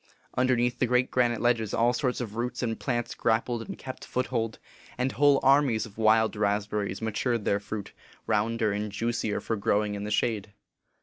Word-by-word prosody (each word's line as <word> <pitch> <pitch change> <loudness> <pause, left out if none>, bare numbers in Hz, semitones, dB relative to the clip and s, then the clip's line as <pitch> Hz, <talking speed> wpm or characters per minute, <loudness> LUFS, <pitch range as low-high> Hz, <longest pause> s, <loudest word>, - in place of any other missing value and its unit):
Underneath 125 -1 +2
the 125 - +2
great 125 +1 +2
granite 120 -2 +2
ledges, 115 -3 +1
all 120 +2 +3
sorts 125 0 -1
of 110 -4 -5
roots 125 +2 -3
and 115 -2 -2
plants 120 -3 -2
grappled 115 +1 0
and - - -7
kept 130 -1 -8
foothold; 120 -3 -2 0.4
and 125 +1 0
whole 145 0 +4
armies 135 -4 +4
of 110 -1 -13
wild 110 0 +4
raspberries 105 0 -1
ma 110 - -1
tured 120 +1 -1
their 100 - +1
fruit, 105 0 -6 0.3
rounder 110 0 +1
and 105 +1 -3
juicier 110 0 -1
for 115 - -2
growing 105 0 +1
in 100 0 -4
the 105 - -4
shade. 105 -2 -1
115 Hz, 180 wpm, -28 LUFS, 105-125 Hz, 0.4 s, whole